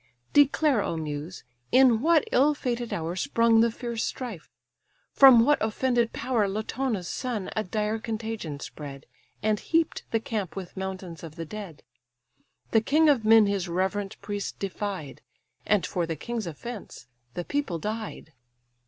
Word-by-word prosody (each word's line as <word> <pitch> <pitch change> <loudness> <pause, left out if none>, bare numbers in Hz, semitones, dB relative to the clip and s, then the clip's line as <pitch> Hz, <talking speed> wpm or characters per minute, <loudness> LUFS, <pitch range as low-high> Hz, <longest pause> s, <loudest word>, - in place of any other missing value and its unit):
Declare, 290 -3 +4
O 165 - -2
Muse! 155 +2 -5 0.3
in 250 -3 +5
what 320 0 +4
ill 290 +4 +4
fated 240 -3 -3
hour 165 +1 -3
Sprung 230 0 +3
the 235 - +4
fierce 235 0 -4
strife, 230 -10 -5 0.6
from 255 -4 +8
what 295 +2 +3
offended 235 +1 +1
power 235 -6 0
Latona's 215 -1 -2
son 235 -4 -3
a 215 - 0
dire 215 +3 -1
contagion 220 -9 -4
spread, 140 -2 -8 0.4
And 215 -1 +2
heap'd 330 -1 0
the 225 - +1
camp 215 -5 -4
with 190 -3 -7
mountains 190 -3 -6
of 160 -2 -9
the 165 - -5
dead; 185 -4 -8 0.9
The 225 - +4
king 305 +6 +4
of 265 -6 +3
men 225 0 +7
his 200 -3 -1
reverent 190 +3 -2
priest 205 -1 -4
defied, 195 -6 -5 0.5
And 210 -3 +3
for 175 -2 -2
the 165 - -2
king's 225 +6 -4
offence 200 - -8 0.3
the 175 - -3
people 285 -12 -1
died. 210 -4 -5
215 Hz, 150 wpm, -27 LUFS, 185-240 Hz, 0.9 s, from